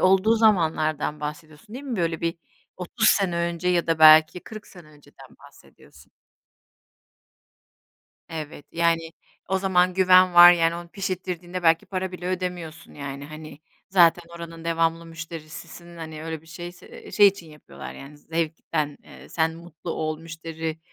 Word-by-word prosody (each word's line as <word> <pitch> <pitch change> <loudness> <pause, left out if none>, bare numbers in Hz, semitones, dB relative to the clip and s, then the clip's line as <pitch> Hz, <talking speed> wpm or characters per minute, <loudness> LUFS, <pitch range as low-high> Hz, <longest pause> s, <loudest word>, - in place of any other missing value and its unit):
olduğu 190 +4 +4
zamanlardan 160 -8 +1
bahsediyorsun 155 +6 -8
değil 270 +3 -8
mi? 255 -5 -4
Böyle 165 -3 -1
bir 165 0 -2 0.4
30 220 +5 0
sene 190 -4 +2
önce 170 +1 -2
ya 175 -2 +1
da 165 -1 0
belki 155 +2 +7
40 215 +2 -11
sene 175 -5 -15
önceden 150 -1 -18
bahsediyorsun? - - -19 2.2
Evet, 155 -3 -8
yani 165 -1 +1 0.4
o 190 +1 +1
zaman 185 -1 +2
güven 185 -1 +5
var, 175 0 +10
yani 165 -1 +1
onu 170 0 -8
pişirttirdiğinde 180 -1 -5
belki 165 0 +3
para 185 -1 -4
bile 180 0 -7
ödemiyorsun 180 -3 -5
yani, 140 -1 -7
hani, 155 0 -11 0.3
zaten 175 -2 +5
oranın 170 -1 -10
devamlı 165 0 0
müşterisisin. 165 +1 -10
Hani, 160 -1 -8
öyle 160 -1 -5
bir - - -22
şeyse 175 +2 -11
ııı, - - -13
şey 205 - +7
için 195 -3 0
yapıyorlar, 150 0 -11
yani, 140 +2 -12
zevkten, 160 -2 -3
eee, - - -15
sen 160 0 0
mutlu 170 0 -9
ol, 155 -1 -3
müşteri, 160 -1 -6
165 Hz, 145 wpm, -24 LUFS, 160-180 Hz, 2.2 s, var